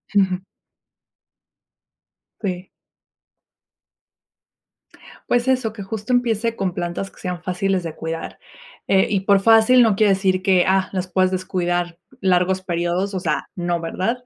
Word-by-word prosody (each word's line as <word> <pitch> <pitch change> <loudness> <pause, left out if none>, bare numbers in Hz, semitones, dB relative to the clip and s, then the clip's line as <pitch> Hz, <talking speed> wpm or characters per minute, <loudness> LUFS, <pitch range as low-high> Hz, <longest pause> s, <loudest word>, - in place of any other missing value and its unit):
Ujú. 190 -2 +2 2.0
Sí. 185 -2 -3 2.6
Pues 245 +1 +1
eso 255 -4 +1
que 205 - -7
justo 215 +4 -4
empiece 230 -2 +1
con 190 -5 -2
plantas 175 +3 -4
que - - -20
sean 180 -1 -4
fáciles 185 +1 -1
de 165 -2 -6
cuidar, 165 0 -6 0.5
eh, 190 0 +3
y 200 -2 0
por 200 0 +4
fácil 225 +4 +6
no 220 -3 +3
quiere 205 -1 +4
decir 190 -1 +1
que, 185 -2 +3
ah, 190 0 +2
las 185 -1 -3
puedes 185 +1 +1
descuidar 175 -2 -2 0.2
largos 185 -1 +2
períodos. 175 +2 -2
O 190 - -1
sea, 180 - -2
no, 175 -1 -1
¿verdad? 185 +8 -2
190 Hz, 135 wpm, -21 LUFS, 180-205 Hz, 2.6 s, fácil